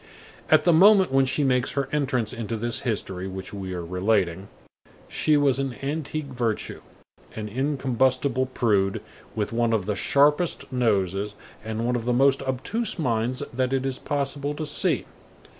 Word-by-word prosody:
At -, -, +5 dB
the 175 Hz, -, +4 dB
moment 190 Hz, +1 st, +6 dB
when 135 Hz, 0 st, +4 dB
she 130 Hz, +3 st, 0 dB
makes 125 Hz, -1 st, +1 dB
her 140 Hz, -2 st, -1 dB
entrance 130 Hz, -6 st, 0 dB
into 115 Hz, -1 st, -4 dB
this 120 Hz, +2 st, -1 dB
history 95 Hz, -6 st, -2 dB
which 95 Hz, +1 st, -7 dB
we 95 Hz, -2 st, -5 dB
are 85 Hz, -1 st, -5 dB
relating, 95 Hz, 0 st, 0 dB, 0.6 s
she 155 Hz, -1 st, +2 dB
was 140 Hz, -2 st, +2 dB
an 135 Hz, -2 st, -2 dB
antique 155 Hz, +1 st, -3 dB
virtue, 115 Hz, -4 st, -2 dB, 0.5 s
an 110 Hz, -1 st, -5 dB
incombustible 130 Hz, +1 st, 0 dB
prude, 105 Hz, -6 st, +1 dB, 0.4 s
with 105 Hz, 0 st, -2 dB
one 115 Hz, 0 st, +1 dB
of 105 Hz, -5 st, 0 dB
the 105 Hz, 0 st, -1 dB
sharpest 150 Hz, -, +2 dB
noses, 100 Hz, -4 st, 0 dB, 0.3 s
and 110 Hz, +1 st, -3 dB
one 125 Hz, +1 st, +1 dB
of 115 Hz, -2 st, -3 dB
the 125 Hz, -, +1 dB
most 135 Hz, +2 st, +3 dB
obtuse 135 Hz, -, -1 dB
minds 125 Hz, -4 st, -1 dB
that 130 Hz, +1 st, 0 dB
it 135 Hz, 0 st, 0 dB
is 135 Hz, -1 st, -2 dB
possible 145 Hz, 0 st, -2 dB
to 155 Hz, -, -4 dB
see. 150 Hz, -, +1 dB
125 Hz, 160 wpm, -25 LUFS, 110-140 Hz, 0.6 s, moment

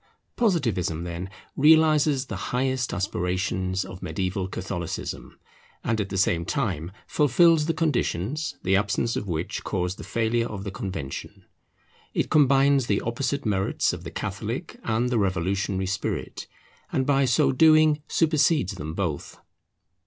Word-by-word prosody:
Positivism, 115 Hz, -, 0 dB
then, 85 Hz, +2 st, -5 dB, 0.3 s
realizes 150 Hz, -2 st, +4 dB
the -, -, -6 dB
highest 130 Hz, 0 st, 0 dB
aspirations 95 Hz, 0 st, -1 dB
of 90 Hz, 0 st, -10 dB
mediaeval 90 Hz, +2 st, -2 dB
Catholicism, 90 Hz, -2 st, -5 dB, 0.5 s
and 110 Hz, -2 st, 0 dB
at 100 Hz, -, -4 dB
the 95 Hz, -, -3 dB
same 85 Hz, -3 st, +2 dB
time 95 Hz, -, -2 dB
fulfils 155 Hz, +2 st, +4 dB
the 165 Hz, -, +1 dB
conditions, 145 Hz, -, -1 dB
the 95 Hz, +1 st, +3 dB
absence 105 Hz, +3 st, 0 dB
of 105 Hz, -, -3 dB
which 85 Hz, +1 st, -3 dB
caused 90 Hz, -1 st, -2 dB
the -, -, -7 dB
failure 115 Hz, +1 st, 0 dB
of 100 Hz, -4 st, -6 dB
the 100 Hz, -, -5 dB
Convention. 80 Hz, -8 st, -6 dB, 0.7 s
It -, -, 0 dB
combines 140 Hz, -2 st, +4 dB
the 100 Hz, -, +1 dB
opposite 135 Hz, +4 st, -2 dB
merits 100 Hz, -2 st, +1 dB
of -, -, -7 dB
the -, -, -6 dB
Catholic -, -, -5 dB
and 115 Hz, +2 st, 0 dB
the 120 Hz, -, +2 dB
Revolutionary 95 Hz, 0 st, 0 dB
spirit, 95 Hz, +1 st, -3 dB, 0.4 s
and 130 Hz, -, 0 dB
by 140 Hz, -1 st, +3 dB
so 125 Hz, -2 st, +3 dB
doing 155 Hz, +1 st, +5 dB
supersedes 155 Hz, -, +2 dB
them 80 Hz, +2 st, -6 dB
both. 85 Hz, -7 st, -3 dB
110 Hz, 140 wpm, -25 LUFS, 95-140 Hz, 0.7 s, doing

